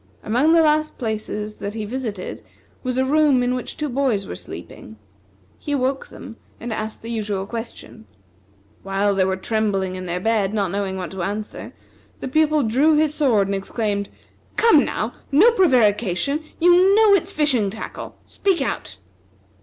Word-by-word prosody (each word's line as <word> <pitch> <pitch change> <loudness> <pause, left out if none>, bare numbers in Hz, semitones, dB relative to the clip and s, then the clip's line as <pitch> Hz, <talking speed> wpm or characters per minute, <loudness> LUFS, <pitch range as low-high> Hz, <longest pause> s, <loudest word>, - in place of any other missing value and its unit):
Among 255 +9 +3
the 330 -1 +6
last 305 0 +1
places 215 -2 -4
that 200 +2 -5
he 215 -2 -3
visited 220 -5 -5 0.4
was 255 -1 -3
a 260 - +2
room 285 -2 +3
in 245 0 +1
which 250 - -5
two 300 - -2
boys 250 -7 0
were - - -6
sleeping. 110 +3 -10 0.6
He 290 - -4
awoke 265 0 -1
them 235 -4 -11 0.2
and 235 -1 -4
asked 215 0 -5
the 230 - -5
usual 205 -4 -2
question. 225 0 -8 0.8
While 195 +1 0
they 190 -1 +2
were 190 0 -1
trembling 195 -2 -1
in 185 0 -6
their 175 +1 -2
bed, 215 0 0
not 200 -4 0
knowing 195 -1 -2
what 180 -2 -5
to 190 -1 -5
answer, 210 +4 -5 0.5
the - - -5
Pupil 305 +1 +2
drew 270 +8 +3
his 305 0 +2
sword 250 -10 +2
and 200 - -2
exclaimed: 200 +1 -2 0.5
"Come, 455 -11 +5
now, 220 +3 -3 0.2
no 370 +13 +6
prevarication; 250 - +2
you 355 +3 +5
know 435 -1 +6
it's 390 - +2
fishing 265 -9 +1
tackle. 220 +3 -8
Speak 385 -4 0
out!" 270 - -3
230 Hz, 165 wpm, -21 LUFS, 200-295 Hz, 0.8 s, the